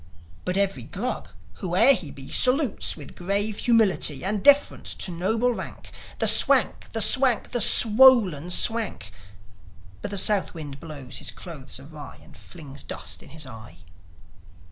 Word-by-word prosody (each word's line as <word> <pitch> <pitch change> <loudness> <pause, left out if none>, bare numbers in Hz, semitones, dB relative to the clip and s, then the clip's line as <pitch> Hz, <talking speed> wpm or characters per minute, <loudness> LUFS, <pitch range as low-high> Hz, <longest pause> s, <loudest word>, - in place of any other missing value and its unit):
But 180 +1 -3
every 195 -1 -2
Glug, 230 +4 -6 0.3
whoe'er 185 +9 +4
he 175 - -4
be, 135 -1 -12
Salutes, 255 - +1
with 145 -3 -13
grave 200 +3 0
humility 210 - +1
And 200 0 -2
deference 285 0 +2
to 185 - -3
noble 220 +8 -2
rank, - - -10 0.3
The - - -1
Swank, - - +3
the - - -1
Swank, 260 -4 +2
the 240 - -1
swollen 215 - +4
Swank; 205 - 0 0.9
But - - -6
the 200 - -6
South 195 -1 +2
wind 145 -4 -10
blows 140 -5 -10
his - - -5
clothes 150 -8 -11
awry, 145 +1 -13
And - - -19
flings 145 -5 -12
dust - - -7
in - - -17
his 155 +1 -8
eye. 115 -7 -14
190 Hz, 145 wpm, -23 LUFS, 150-225 Hz, 0.9 s, whoe'er